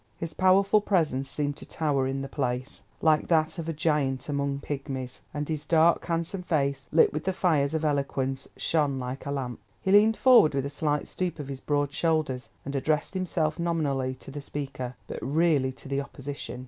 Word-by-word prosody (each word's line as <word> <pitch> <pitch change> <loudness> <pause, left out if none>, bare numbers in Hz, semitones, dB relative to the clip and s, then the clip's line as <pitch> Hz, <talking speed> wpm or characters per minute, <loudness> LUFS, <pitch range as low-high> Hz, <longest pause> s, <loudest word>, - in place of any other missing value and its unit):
His 165 -1 -5
powerful 195 +3 +4
presence 155 -10 +1
seemed 145 0 -2
to - - -9
tower 140 -4 0
in 135 +1 -2
the - - -4
place, 130 -2 -3 0.2
like 155 -1 +4
that 160 0 +2
of 165 0 -4
a - - +1
giant 150 -4 0
among 140 -1 -1
pigmies, 135 -3 -5
and 145 0 -3
his 150 -2 -4
dark, 165 +1 +4
handsome 170 +2 -1
face, 140 -6 -1
lit 160 - +5
with 155 +1 -3
the 190 - +1
fires 155 -5 +2
of 160 0 0
eloquence, 135 -2 -1
shone 145 -4 +1
like 130 +2 -5
a - - -2
lamp. 130 -4 -3 0.2
He 190 - -1
leaned 215 +2 +6
forward 245 - +6
with 135 -1 0
a 140 - -4
slight 150 0 0
stoop 180 -2 -3
of 145 -3 -6
his 135 -1 -5
broad 145 0 0
shoulders, 155 -6 0 0.2
and 140 +1 -4
addressed 150 +5 0
himself, 170 -4 -1
nominally 140 -6 0
to 135 - -11
the 145 +1 -6
Speaker, 135 -3 -5
but - - -6
really 145 -2 +2
to 135 - -11
the 140 +1 -1
Opposition. 140 -3 -7
145 Hz, 195 wpm, -27 LUFS, 135-160 Hz, 0.2 s, leaned